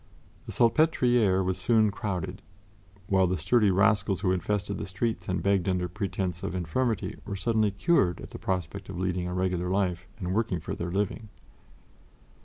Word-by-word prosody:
The - - -5
Salpêtrière 120 - +3
was 95 0 -1
soon 110 -3 +3
crowded, 95 -3 -4 0.6
while 95 -1 +3
the 90 +1 0
sturdy 105 +6 +3
rascals 100 0 +2
who 90 - +2
infested 100 +2 -1
the - - -4
streets 110 +4 -2
and 90 - -1
begged 100 -2 +2
under 90 -1 0
pretense 95 -2 -3
of 95 - -4
infirmity 110 +7 -1
were 100 - -5
suddenly 110 +1 +1
cured 100 - +2
at - - -10
the - - -8
prospect 95 +1 -3
of 95 - -6
leading 90 -1 -1
a 90 - -4
regular 90 -1 0
life 95 -2 0
and 90 -4 -3
working 110 -4 0
for 80 - -5
their 85 - -4
living. 105 +3 -2
95 Hz, 170 wpm, -28 LUFS, 90-105 Hz, 0.6 s, Salpêtrière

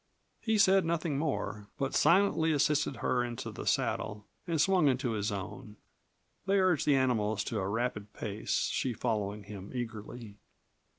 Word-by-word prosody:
He 220 -1 +1
said 195 -2 +5
nothing 165 -3 -1
more, 120 -9 -3
but 135 0 -2
silently 165 -1 +4
assisted 145 -1 +2
her 125 -1 +2
into 120 -1 -5
the - - -7
saddle 105 -1 -1 0.2
and 165 -2 0
swung 185 -1 +4
into 130 -2 +1
his 105 -2 -1
own. 105 +3 -6 0.7
They 195 0 +3
urged 185 -6 +2
the 145 - +5
animals 110 -6 +1
to 110 0 -3
a 95 - -2
rapid 105 -2 -2
pace, - - -2
she 130 - 0
following 105 -3 -2
him 100 -1 -9
eagerly. 110 -2 -6
125 Hz, 155 wpm, -31 LUFS, 105-155 Hz, 0.7 s, said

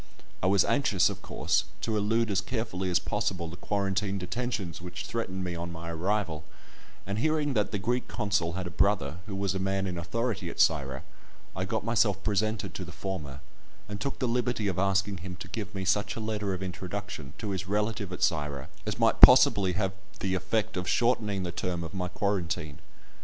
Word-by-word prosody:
I 95 - +2
was 95 0 +5
anxious, 120 -10 +3
of - - -8
course, - - 0 0.2
to 110 - -1
elude 110 +2 +2
as 100 0 +2
carefully 100 -5 -2
as 90 - +4
possible 95 -3 -1
the 80 - -7
quarantine 100 +1 -1
detentions 95 -2 -3
which 90 0 -6
threatened 95 -5 -3
me 90 -1 -3
on 85 0 -4
my 85 0 -6
arrival, 85 -2 -1 0.6
and 100 +2 -2
hearing 150 +1 +1
that 105 -4 +1
the 105 - -2
Greek 120 +5 -1
consul 95 -5 0
had 95 +1 -3
a 90 - -5
brother 85 -4 +2
who 100 - -4
was 100 -1 0
a 95 - -2
man 95 0 0
in 90 -2 -3
authority 100 +1 -2
at - - -8
Syra, 70 -4 +2 0.5
I 95 +1 -1
got 110 +2 -2
myself 105 -4 +2
presented 110 +1 0
to 95 - -5
the 90 - -8
former, 75 -8 -5 0.5
and 105 -1 -6
took 140 - -2
the 130 - 0
liberty 120 -2 0
of 95 -2 -1
asking 95 0 +2
him 90 +1 -7
to 95 - -8
give 105 +2 -5
me 95 -1 -3
such 105 +1 +1
a - - -4
letter 105 -2 -2
of 95 - -5
introduction 95 -5 -5
to 105 -3 -3
his 95 0 -3
relative 105 0 -1
at 90 - -3
Syra 75 -4 0 0.2
as - - -1
might - - +3
possibly 95 -3 +9
have 95 0 0 0.3
the 95 -1 -1
effect 110 +3 0
of 90 -1 -2
shortening 105 -5 +2
the 90 - -2
term 85 -1 -2
of 80 - -7
my 90 -2 -2
quarantine. 85 -6 -2
95 Hz, 200 wpm, -29 LUFS, 90-105 Hz, 0.6 s, possibly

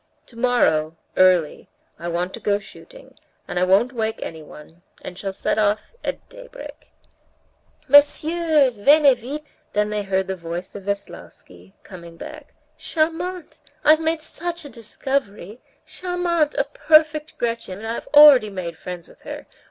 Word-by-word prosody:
"Tomorrow, 230 -11 +1 0.2
early, 180 -4 +3 0.3
I 170 - -6
want 175 +2 -2
to - - -7
go 205 -1 +1
shooting, - - -15 0.3
and 180 - -2
I - - +2
won't 200 +7 +3
wake 220 -2 -2
anyone, 160 +1 -11 0.2
and 180 - -8
shall 195 +1 -5
set 190 - -2
off 210 - 0
at - - -5
daybreak." - - -12 1.0
"Messieurs, 290 -1 +4
venez 280 +3 +5
vite!" 280 +6 -6 0.3
they 210 0 0
heard 190 -1 -1
the 190 - -4
voice 170 +1 -7
of 200 -2 -9
Veslovsky 95 - -8
coming 170 -3 -12
back. 305 - -11 0.2
"Charmante! 335 +3 -3 0.3
I've 310 +1 +6
made 320 0 -1
such 340 0 -5
a - - -8
discovery. 230 -3 -4 0.2
Charmante! 350 -4 -1
a - - +3
perfect 310 -1 +2
Gretchen, 230 -5 -3
and 215 - -9
I've 230 - -5
already 290 -7 +8
made 175 -4 -6
friends 175 -1 -7
with - - -20
her. - - -8
230 Hz, 140 wpm, -22 LUFS, 185-305 Hz, 1.0 s, already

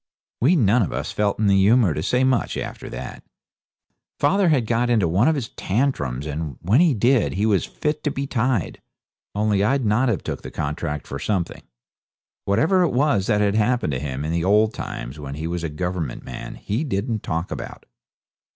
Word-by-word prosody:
We 150 +10 +4
none 120 - +4
of 95 - -1
us - - -3
felt 105 -1 0
in 110 - 0
the 100 -1 +4
humour 100 -1 +4
to 75 - -3
say 125 +9 +1
much 130 -2 +1
after - - -6
that. - - -7 1.0
Father 185 +5 +3
had 135 -7 +2
got 120 +2 +1
into 110 -7 +3
one 95 - +3
of 160 - +3
his 130 -6 -3
tantrums, 85 - -1
and 75 -2 -4
when 105 - +3
he 165 -7 +4
did 120 +3 +2
he 100 +3 0
was 100 -6 +2
fit 150 0 -3
to - - +3
be 140 -1 -3
tied; 125 - -1 0.5
only 105 -1 +2
I'd 130 +3 +1
not 115 +5 +2
have 105 -8 -1
took - - -4
the - - -7
contract 75 0 -3
for 70 - -6
something. 95 -5 -2 0.8
Whatever 160 - +3
it 170 -7 +2
was 130 -7 +2
that 105 -2 +2
had 100 -1 +2
happened 110 - +1
to 65 - -2
him 70 0 -4
in 80 - -2
the 85 0 0
old 105 +3 +3
times 65 +5 -6
when 70 -1 -6
he 80 +2 -5
was 85 0 -3
a 85 - -2
Government 85 -3 -4
man 65 - -7
he 110 +9 -2
didn't 110 -4 -2
talk 85 +2 -3
about. - - -7
105 Hz, 200 wpm, -22 LUFS, 85-125 Hz, 1.0 s, We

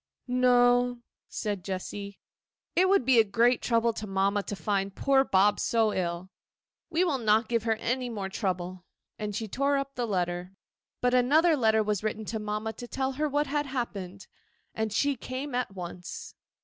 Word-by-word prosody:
'No,' 245 0 +4 0.3
said 205 -5 -3
Jessy; 200 +1 -5 0.6
'it 370 +1 +4
will 395 - +6
be 255 -4 +4
a - - +7
great 230 +4 +2
trouble 230 -1 +2
to 215 0 -6
mamma 195 +1 +1
to 205 - -5
find 195 +2 -1
poor 270 -1 +3
Bob 205 -3 +3
so 225 -2 +2
ill. 175 +1 -3 0.6
We 340 +2 +2
will 305 -7 0
not 220 0 +3
give 230 -1 0
her 225 -1 +2
any 250 +3 -2
more 205 -4 -4
trouble.' 185 -2 -3 0.4
And 210 -1 -3
she 220 +1 -3
tore 275 +6 +1
up 275 0 -3
the 245 -3 -2
letter. 180 -2 -2 0.5
But 250 0 +2
another 305 +7 +4
letter 220 -4 +3
was 210 -1 -1
written 215 0 -2
to 220 +1 -3
mamma 210 +1 -3
to 245 - -9
tell 265 +2 -1
her 300 +3 -1
what 290 +1 +1
had 290 +1 -1
happened, 200 -8 -5 0.5
and 220 -1 -2
she 280 +7 +1
came 260 +3 -5
at 245 -5 -2
once. 175 0 -7
225 Hz, 175 wpm, -28 LUFS, 200-255 Hz, 0.6 s, a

